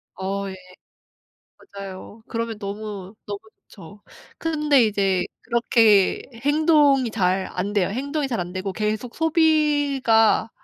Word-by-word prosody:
어 195 +1 -3
예. 190 - -7 1.2
맞아요. 195 +3 -9
그러면 230 -2 -4
너무, 200 -1 -7
너무 205 -1 -5 0.3
좋죠. 200 +2 -14 0.4
근데 300 -6 +2
이제 195 -4 +1 0.2
그렇게 225 -4 +3
행동이 290 -1 +3
잘 190 -3 0
안 195 +3 -3
돼요. 200 -3 +1
행동이 280 +7 -2
잘 235 -7 -2
안 175 0 -5
되고 190 +1 -4
계속 215 +4 -3
소비가 290 -9 +2
220 Hz, 225 characters per minute, -23 LUFS, 195-280 Hz, 1.2 s, 그렇게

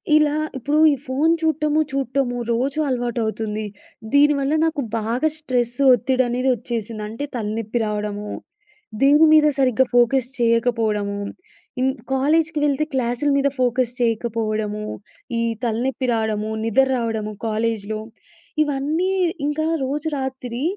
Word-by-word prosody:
ఇలా 300 -1 +4 0.2
ఇప్పుడు 290 +4 0
ఈ - - 0
ఫోన్ 285 +6 +2
చూడటము, 310 -1 +1
చూడటము 265 -2 -1 0.2
రోజు 270 +5 -1
అలవాటవుతుంది. 220 -3 -2 0.5
దీనివల్ల 285 0 +4
నాకు 315 -3 -1 0.2
బాగా 230 +7 0
స్ట్రెస్ 245 -5 -1 0.2
ఒత్తిడి 255 +2 +2
అనేది 250 +2 0
వచ్చేసింది. 230 -2 -5
అంటే 230 +6 -4
తలనొప్పి 220 +1 -2
రావడము, 210 0 -3 0.7
దీని 290 +3 +6
మీద 305 -1 +6
సరిగ్గా 260 -1 +3
ఫోకస్ 245 +1 +3
చేయకపోవడము, 225 -3 +1 0.6
ఇం 260 - +3 0.3
కాలేజ్‌కి 310 +3 +2
వెళ్తే 285 +1 +1
క్లాసుల 250 +2 0
మీద 280 - +2
ఫోకస్ 250 -1 +1
చేయకపోవడము, 220 -2 -1 0.5
ఈ - - +1 0.2
తలనొప్పి 250 +3 -1
రావడము, 220 -1 -1
నిద్ర 265 +4 +3
రావడము 220 -3 -2
కాలేజ్‌లో 220 -1 -2 0.6
ఇవన్నీ. 300 +6 -1 0.4
ఇంకా 310 +1 -1 0.2
రోజు 295 +4 -3
రాత్రి 260 -1 -4
245 Hz, 115 wpm, -21 LUFS, 225-280 Hz, 0.7 s, దీని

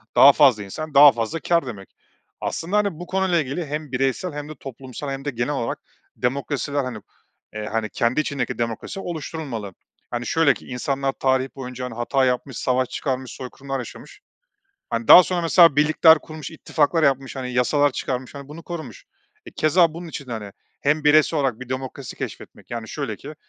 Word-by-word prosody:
daha 140 - +9
fazla 130 -9 +4
insan, 155 +10 -7
daha 145 0 +9
fazla 115 +6 -3
kâr 170 +1 +1
demek. 100 -6 -8 0.5
Aslında, 180 +6 -2
hani, 200 -6 0
bu 175 - -6
konuyla 190 -2 +1
ilgili 150 +5 -4
hem 150 -1 -5
bireysel 135 +6 -1
hem 145 0 -6
de - - -6
toplumsal 135 +1 -8
hem 135 +1 -6
de - - 0
genel 120 +3 -2
olarak 120 -5 -3 0.4
demokrasiler, 140 +2 -1
hani, 125 -4 -5 0.5
eee, 105 0 -5
hani, 110 -1 -1
kendi 120 +7 +1
içindeki 140 -4 -3
demokrasi 115 - -4
oluşturulmalı. 150 - -5 0.4
Hani, 120 0 -3
şöyle 160 -3 +4
ki, - - -14
insanlar 135 +2 -1
tarih 130 0 +1
boyunca, 125 -1 -6
hani, 125 - -6
hata 130 +3 +1
yapmış, 125 0 -1
savaş 130 0 0
çıkarmış, 130 -2 -3
soykırımlar 135 +1 -6
yaşamış, 125 - -10 0.7
hani, 115 -1 -2
daha 180 - +11
sonra 180 -1 -1
mesela 165 -3 +6
birlikler 155 +2 +6
kurmuş, 155 -1 -9
ittifaklar 160 0 0
yapmış, 135 -2 +1
hani, 125 -1 -4
yasalar 145 +4 +3
çıkarmış, 130 0 -4
hani, 140 -1 -9
bunu 155 +3 -10
korumuş. 160 - -8 0.4
E, - - -8
keza 165 +1 +3
bunun 170 +1 -7
için 145 -3 -7
de, 125 - -6
hani, 105 -3 -6 0.3
hem 150 +2 +1
bireysel 155 +1 +4
olarak 130 -4 -1
bir 130 - -8
demokrasi 130 0 -6
keşfetmek - - -8
yani 115 -2 -5
şöyle 135 -8 -4
ki, 145 +7 -10
135 Hz, 180 wpm, -23 LUFS, 125-155 Hz, 0.7 s, daha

